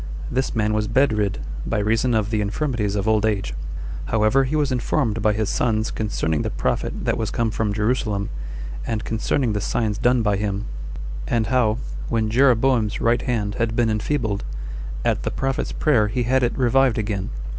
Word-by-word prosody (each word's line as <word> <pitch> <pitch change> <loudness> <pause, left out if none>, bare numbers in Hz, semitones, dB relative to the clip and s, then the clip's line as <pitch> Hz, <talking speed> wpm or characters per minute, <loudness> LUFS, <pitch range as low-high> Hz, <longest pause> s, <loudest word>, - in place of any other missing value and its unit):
This 130 +1 -1
man 105 -1 +1
was 105 0 0
bedrid, 110 -4 +2 0.3
by 115 - -1
reason 115 +4 +2
or 110 - +3
the 105 +1 -1
infirmities 105 -1 -1
of 100 +1 -1
old 110 -1 +3
age: 100 - 0 0.5
however, 110 +5 +3
he 140 +4 -2
was 145 -3 +1
informed 120 -2 0
by 105 0 +4
his 105 0 0
sons 110 -1 0
concerning 80 -8 -1
the - - -1
prophet - - -2
that - - +1
was 110 -2 -1
come 115 -2 0
from 110 -1 -1
Jerusalem, 105 -1 0 0.5
and 110 -1 -2
concerning 115 +2 0
the 105 - -1
signs 105 -1 -1
done 125 -1 +3
by 105 -2 +2
him; 100 0 -2 0.6
and 115 - +1
how, 115 -4 +2 0.3
when 110 -2 0
Jeroboam's 125 -3 +3
right 115 +1 +2
hand 105 -5 -1
had 115 -1 0
been 115 -2 +2
enfeebled, 110 -2 -1 0.6
at - - +2
the - - -2
prophet's 135 0 -1
prayer 120 -9 +3
he 120 +4 -1
had 130 +3 +2
it 120 -1 0
revived 130 -1 +3
again. 105 -2 -2
110 Hz, 175 wpm, -23 LUFS, 105-125 Hz, 0.6 s, by